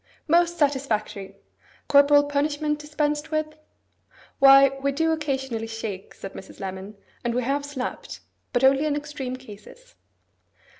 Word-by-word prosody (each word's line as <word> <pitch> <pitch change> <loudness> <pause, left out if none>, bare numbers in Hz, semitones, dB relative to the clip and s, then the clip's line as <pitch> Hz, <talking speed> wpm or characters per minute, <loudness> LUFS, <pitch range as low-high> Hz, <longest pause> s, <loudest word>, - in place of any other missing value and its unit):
'Most 345 +2 +3
satisfactory! 260 - -1 0.5
Corporal 285 0 +6
punishment 295 +1 -1
dispensed 300 0 -2
with?' 310 -1 -2 0.8
'Why, 275 0 +8
we 280 0 +1
do 325 +4 +1
occasionally 265 -7 -2
shake,' 220 -4 -6
said 195 - -9
Mrs. 190 - -11
Lemon, 190 +2 -7 0.3
'and 240 0 -1
we 250 - 0
have 280 +3 -1
slapped. 285 -3 -6 0.3
But 245 -1 0
only 270 +2 +4
in 290 - 0
extreme 285 -3 -5
cases. 255 - -14
280 Hz, 130 wpm, -24 LUFS, 240-300 Hz, 0.8 s, Why